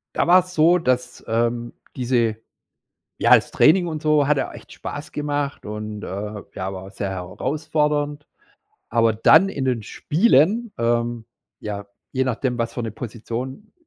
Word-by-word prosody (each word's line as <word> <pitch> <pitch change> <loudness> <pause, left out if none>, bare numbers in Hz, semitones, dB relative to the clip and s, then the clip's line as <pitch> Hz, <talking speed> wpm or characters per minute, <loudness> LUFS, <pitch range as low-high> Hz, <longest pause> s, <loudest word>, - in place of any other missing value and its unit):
da - - +1
war's 180 +1 +5
so, 170 +2 +5
dass, 125 -6 -1
ähm, 120 +1 -1 0.2
diese 120 -3 +1 0.8
ja, - - +6
das - - +3
Training 175 +3 +4
und 155 -2 -4
so 150 -2 +3
hat 150 0 +3
auch - - -4
echt - - -12
Spaß 145 +1 -7
gemacht 145 -1 -3
und, 105 0 -6
äh, - - -6 0.5
ja, 95 +1 -4
war 95 0 -7
auch - - -11
sehr 100 -1 -4
herausfordernd. 145 - -2 0.6
Aber 115 -1 +3
dann 160 - +6
in 140 -8 -3
den 125 -4 0
Spielen, 200 - +2
ähm, 120 0 0 0.3
ja, 100 -1 -6 0.3
je 130 -1 +1
nachdem, 125 0 -1
was 115 -1 -2
für 120 - -4
'ne 110 - -4
Position 125 - -6
130 Hz, 155 wpm, -22 LUFS, 115-150 Hz, 0.8 s, ja